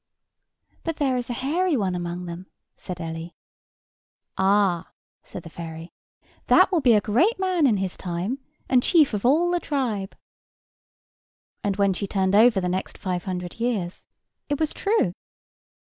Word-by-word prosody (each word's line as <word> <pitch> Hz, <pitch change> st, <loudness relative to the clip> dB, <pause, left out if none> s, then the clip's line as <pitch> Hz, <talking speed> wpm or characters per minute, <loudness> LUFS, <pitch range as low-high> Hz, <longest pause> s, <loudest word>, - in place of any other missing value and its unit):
"But 330 Hz, -2 st, -2 dB
there 270 Hz, -4 st, +1 dB
is 245 Hz, -1 st, -3 dB
a -, -, -1 dB
hairy 300 Hz, +6 st, 0 dB
one 195 Hz, -4 st, 0 dB
among 175 Hz, 0 st, -4 dB
them," 175 Hz, +2 st, -7 dB, 0.3 s
said 180 Hz, -2 st, -7 dB
Ellie. 165 Hz, 0 st, -6 dB, 1.0 s
"Ah!" 190 Hz, -3 st, +2 dB, 0.3 s
said 175 Hz, -, -9 dB
the 165 Hz, -, -9 dB
fairy, 165 Hz, 0 st, -8 dB, 0.6 s
"that -, -, +6 dB
will 345 Hz, -4 st, +2 dB
be 245 Hz, -4 st, +5 dB
a 210 Hz, -, +4 dB
great 270 Hz, -, +2 dB
man 370 Hz, -5 st, +2 dB
in 220 Hz, -5 st, +3 dB
his 190 Hz, -1 st, -2 dB
time, 185 Hz, +9 st, -3 dB, 0.3 s
and 255 Hz, -1 st, +4 dB
chief 310 Hz, -, +4 dB
of 210 Hz, +3 st, 0 dB
all 335 Hz, +6 st, +3 dB
the 350 Hz, -, +1 dB
tribe." 235 Hz, -, -2 dB, 1.5 s
And, 200 Hz, -1 st, 0 dB
when 200 Hz, -1 st, +2 dB
she 200 Hz, +2 st, -3 dB
turned 190 Hz, -1 st, 0 dB
over 220 Hz, 0 st, +6 dB
the 180 Hz, -, -1 dB
next 185 Hz, +1 st, -3 dB
five 180 Hz, -2 st, -3 dB
hundred 180 Hz, +1 st, -5 dB
years, 215 Hz, -7 st, -2 dB, 0.4 s
it 290 Hz, -, -1 dB
was 315 Hz, -1 st, 0 dB
true. 400 Hz, -, +1 dB
205 Hz, 160 wpm, -24 LUFS, 180-270 Hz, 1.5 s, that